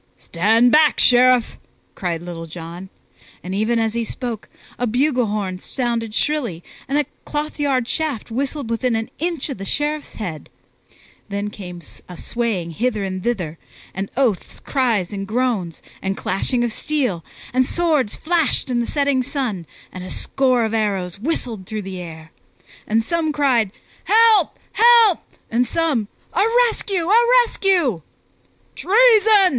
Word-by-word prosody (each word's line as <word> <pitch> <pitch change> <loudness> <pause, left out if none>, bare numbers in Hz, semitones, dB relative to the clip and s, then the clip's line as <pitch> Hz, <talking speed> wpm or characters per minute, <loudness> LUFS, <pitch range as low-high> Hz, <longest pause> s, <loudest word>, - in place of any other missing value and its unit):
"Stand 225 +8 +2
back, 305 -1 +5
Sheriff!" 250 -1 +4 0.3
cried 170 -3 -3
Little 170 -1 -7
John; 170 +3 -8 0.5
and 185 - -5
even 220 +4 +1
as 225 -1 0
he 235 0 -1
spoke, 230 -1 -5 0.3
a 245 - 0
bugle 250 +1 +1
horn 200 -3 -3
sounded 230 -2 -3
shrilly 245 - -1 0.2
and 275 - 0
a 295 - +2 0.2
clothyard 290 -4 -1
shaft 290 -8 -3
whistled 270 0 -3
within 235 +1 0
an 225 0 -3
inch 335 -3 -2
of 265 - -5
the - - -5
Sheriff's 295 +7 -3
head. 175 -8 -6 0.8
Then 200 +1 -3
came 180 -4 -9 0.3
a 180 - -9
swaying 215 -8 -2
hither 220 +3 -1
and 185 -1 -4
thither, 180 -10 -2 0.3
and 195 +1 -4
oaths, 240 -9 0
cries, 230 -9 0
and 195 -1 -4
groans, 220 -7 -1 0.2
and 195 0 -2
clashing 240 +6 0
of 240 - -1
steel, 250 - -1 0.3
and 255 +1 +4
swords 305 -6 +1
flashed 320 -5 0
in 240 - +1
the 235 - -1
setting 280 -3 +1
sun, 245 - -3 0.2
and 185 - -8
a 185 - -7
score 255 -4 +1
of 220 - -3
arrows 195 -4 -1
whistled 230 - -2
through 215 -1 -4
the 190 -1 -6
air. 160 -2 -10 0.6
And 225 +1 +2
some 325 +4 0
cried, 255 -9 +2 0.3
"Help, 440 -5 +4
help!" 460 -5 +6 0.3
and 240 +2 +2
some, 295 -8 0 0.3
"A 370 - +2 0.3
rescue, 380 -6 -2
a 455 +5 +5 0.2
rescue!" 350 - +1 0.7
"Treason!" 440 +1 +5
235 Hz, 145 wpm, -20 LUFS, 195-290 Hz, 0.8 s, help